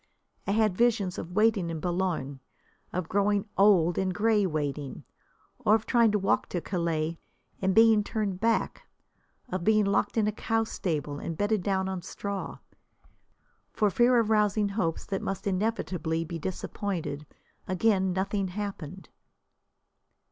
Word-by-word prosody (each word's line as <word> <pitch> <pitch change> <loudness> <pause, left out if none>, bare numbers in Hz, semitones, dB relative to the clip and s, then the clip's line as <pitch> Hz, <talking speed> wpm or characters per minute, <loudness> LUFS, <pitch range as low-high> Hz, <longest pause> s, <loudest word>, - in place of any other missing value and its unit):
I - - +1
had 215 -3 +2
visions 215 -5 +1
of 170 +2 -7
waiting 210 -4 +2
in 165 -1 -4
Boulogne, 175 -6 -2 0.5
of 180 -2 -3
growing 200 +2 +1
old 185 -4 +4
and 190 -1 0
grey 210 -1 +3
waiting, 145 -3 -3 0.6
or 220 -4 +4
of 220 - -2
trying 235 -3 +4
to - - +3
walk 195 -1 0
to 175 - -2
Calais 165 -2 -2 0.4
and 190 0 +1
being 225 -2 +6
turned 205 -4 -2
back, 230 +1 0 0.6
of 185 -5 -3
being 215 +1 +4
locked 200 +3 0
in 220 - +3
a 210 - +1
cow 225 +1 0
stable 150 -9 -3
and 165 - -5
bedded 205 0 +1
down 190 0 0
on 190 -1 -3
straw. 200 +2 -5 1.2
For 210 -2 +2
fear 245 +4 +4
of 225 -2 +2
rousing 210 -1 +2
hopes 185 -6 -2
that 195 - -3
must 195 +3 -4
inevitably 185 -5 -1
be 165 0 -6
disappointed, 175 -4 -4 0.4
again 190 0 +2
nothing 195 +1 -1
happened. 185 -3 -6
195 Hz, 145 wpm, -28 LUFS, 175-215 Hz, 1.2 s, being